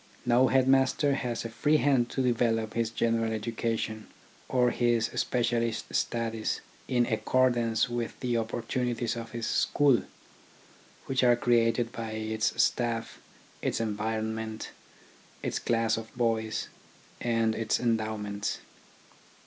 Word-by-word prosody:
No 125 +2 +5
headmaster 135 +2 +3
has 120 -4 -2
a - - -3
free 150 +7 +2
hand 135 -5 +2
to 130 - -1
develop 115 -3 +1
his 115 -1 0
general 115 0 0
education 110 0 -2 0.4
or 125 -2 +3
his 120 -2 +1
specialist 120 -2 -1
studies 115 -2 -1 0.3
in 120 -2 +2
accordance 120 0 +2
with 120 -1 -4
the 125 -2 -1
opportunities 115 +1 -1
of 115 -1 -6
his 115 0 -4
school, 140 -6 +3 1.0
which 130 -1 0
are 120 -1 +6
created 120 -1 +2
by 115 -1 -5
its 110 +1 -1
staff, 115 -1 -1 0.4
its - - -1
environment, 110 0 -3 0.7
its - - -1
class 115 -1 +1
of 110 0 -7
boys, 110 -2 0 0.5
and 115 -2 +1
its 110 0 0
endowments. 110 -3 -1
115 Hz, 115 wpm, -29 LUFS, 110-120 Hz, 1.0 s, are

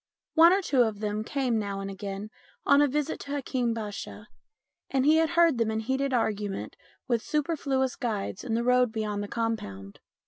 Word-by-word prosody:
One 335 +1 +7
or 390 +1 +2
two 270 -7 +3
of 220 -3 +1
them 210 0 -2
came 250 -2 0
now 200 -2 -3
and 195 - -4
again 200 +1 -6 0.3
on 280 +1 +6
a 290 - +5
visit 295 +2 -2
to 280 - -8
Hakeem 255 -4 -1
Basha, 215 0 -6 0.6
and 265 -1 +1
he 310 +2 +6
had 320 0 +3
heard 335 -7 +5
them 230 -1 +2
in 220 0 -1
heated 265 +4 -1
argument 210 -5 -1 0.3
with 235 -3 +1
superfluous 280 -3 -1
guides 210 -6 -3
in 230 -3 -1
the 235 - 0
road 250 -1 +3
beyond 210 -2 -2
the 205 - -4
compound. 150 - -4
235 Hz, 185 wpm, -28 LUFS, 210-275 Hz, 0.6 s, One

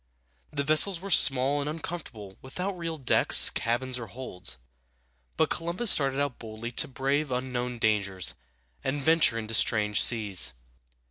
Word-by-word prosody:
The 140 -1 -3
vessels 155 +5 +4
were 195 +2 -7
small 135 -1 +5
and 145 - -4
uncomfortable, 150 - -8
without 180 +9 -5
real 165 -2 -5
decks, 135 - +5
cabins, 125 +2 -2
or 115 - -7
holds; 95 - -7 0.8
but 160 - +1
Columbus 175 +7 0
started 135 -1 +1
out 140 -3 -3
boldly 110 +1 -8
to - - 0
brave 135 +3 -2
unknown 125 -1 -3
dangers 100 -5 -1 0.5
and 135 +2 -2
venture 160 -4 +3
into 110 0 -5
strange 105 -1 +2
seas. 105 - 0
130 Hz, 140 wpm, -27 LUFS, 115-155 Hz, 0.8 s, small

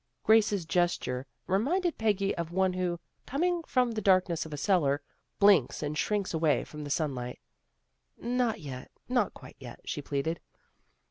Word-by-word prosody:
Grace's 210 -4 +4
gesture 145 -6 0 0.2
reminded 310 - +1
Peggy 205 -3 +1
of 170 -1 -3
one 190 0 +2
who, 180 -2 -1 0.3
coming 345 +5 0
from 250 -2 +2
the 220 -1 -3
darkness 185 -4 +2
of - - -12
a 150 - -4
cellar, 145 -4 +2 0.4
blinks 195 -10 +4
and 150 +1 -2
shrinks 200 +5 -1
away 160 -2 +2
from 150 -1 -8
the 145 - -6
sunshine. 135 -5 -2 0.5
" - - -49
Not 240 -2 0
yet. 130 -4 -7 0.2
Not - - +1
quite - - -13
yet," - - -10
she - - -3
pleaded. 145 +4 -2
180 Hz, 155 wpm, -29 LUFS, 150-215 Hz, 0.5 s, Grace's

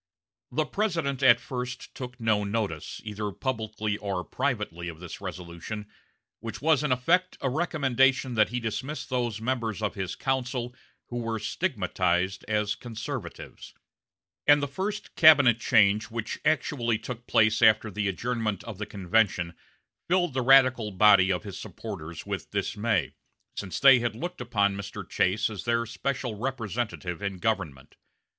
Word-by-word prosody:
The 155 +1 0
President 165 -9 -1
at 120 -3 +7
first 125 +1 -6
took 125 -1 -8
no 110 -2 +2
notice, 100 -7 -3
either 105 -1 -4
publicly 110 -1 -3
or 100 -4 -3
privately, 105 -11 -2
of 80 -2 -7
this 90 +1 -8
resolution, 90 +3 -6 0.5
which 115 0 -6
was 155 -1 +3
in 150 -3 -1
effect 175 +9 +2
a 135 - -1
recommendation 135 -4 +2
that 110 -2 +3
he 125 +2 -2
dismiss 130 +6 -4
those 120 -4 -2
members 115 -3 -2
of 105 -2 -1
his 95 -3 -4
council 125 -2 -2 0.4
who 120 - -4
were 115 -1 -2
stigmatized 95 - -1
as 105 -1 +1
conservatives; 115 -2 -7 0.7
and 145 0 +6
the - - 0
first 195 +9 -4
cabinet 140 -8 +7
change 105 -3 +4
which 115 -1 -4
actually 140 -7 +1
took 120 +1 -8
place 110 0 +3
after 110 -1 +5
the 105 +1 -1
adjournment 110 +1 -2
of 110 -4 -8
the 105 - -4
convention 95 -3 +1 0.5
filled 175 -3 +2
the 130 - 0
radical 130 -3 +5
body 100 -1 +5
of 90 - -1
his 100 -4 -7
supporters 80 +1 -7
with - - -4
dismay, 105 -3 -1 0.4
since 95 -3 -4
they 135 -2 +8
had 120 -2 -2
looked 175 +5 -5
upon 100 -5 +1
Mr. 100 0 -7
Chase 105 +5 +1
as 105 -4 -7
their 115 0 +1
special 125 +1 -3
representative 110 -6 -3
in 100 -1 -2
the 95 - -11
government. 90 -11 -2
115 Hz, 150 wpm, -27 LUFS, 100-130 Hz, 0.7 s, they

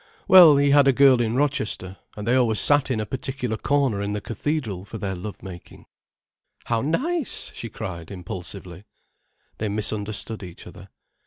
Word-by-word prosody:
"Well, 175 -6 +8
he 140 0 +3
had 140 -1 +5
a 135 - +5
girl 130 -2 +5
in 115 0 -1
Rochester, 125 -9 -2 0.2
and 105 +1 -6
they 120 - +2
always 120 -4 +2
sat 145 -2 +4
in 125 -4 -1
a 110 - -2
particular 130 -1 -4
corner 135 -5 0
in 100 0 -3
the 105 - -2
cathedral 110 - -4
for 105 +3 -9
their 100 -2 -4
love 95 +3 -8
making." 90 -2 -11 0.8
"How 115 -1 -1
nice!" 280 - -1
she 115 - -7
cried, 90 -6 -7
impulsively. 90 0 -8 0.7
They 110 - -2
misunderstood 105 +1 -1
each 90 -3 -10
other. - - -13
110 Hz, 165 wpm, -23 LUFS, 100-140 Hz, 0.8 s, Well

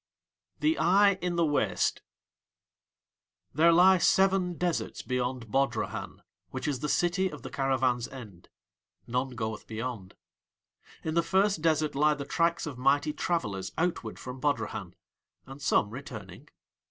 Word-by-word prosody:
THE 315 +1 +2
EYE 195 +2 +4
IN 180 -1 -1
THE 170 -1 +3
WASTE 145 -2 0 1.5
There 165 +4 +5
lie 180 +2 +6
seven 190 -1 +3
deserts 175 -1 -2
beyond 125 -3 -3
Bodrahan, 135 +3 -1 0.3
which - - -5
is 140 -4 -1
the 150 - -3
city 180 +4 +1
of 150 - -10
the 130 - -7
caravans' 130 -3 0
end. 105 -10 -12 0.6
None 125 +1 -2
goeth 110 -2 -4
beyond. 110 -4 -5 0.9
In 160 - -2
the 170 - +3
first 190 +1 +1
desert 155 -2 +1
lie 150 +2 +3
the 140 -1 -6
tracks 170 +3 +1
of 140 -5 -6
mighty 145 +3 +2
travellers 100 - -2
outward 165 -10 -1
from 125 0 -8
Bodrahan, 110 -9 -2 0.5
and 135 +2 -11
some 105 -7 +2
returning. 110 - -9
140 Hz, 135 wpm, -29 LUFS, 125-170 Hz, 1.5 s, lie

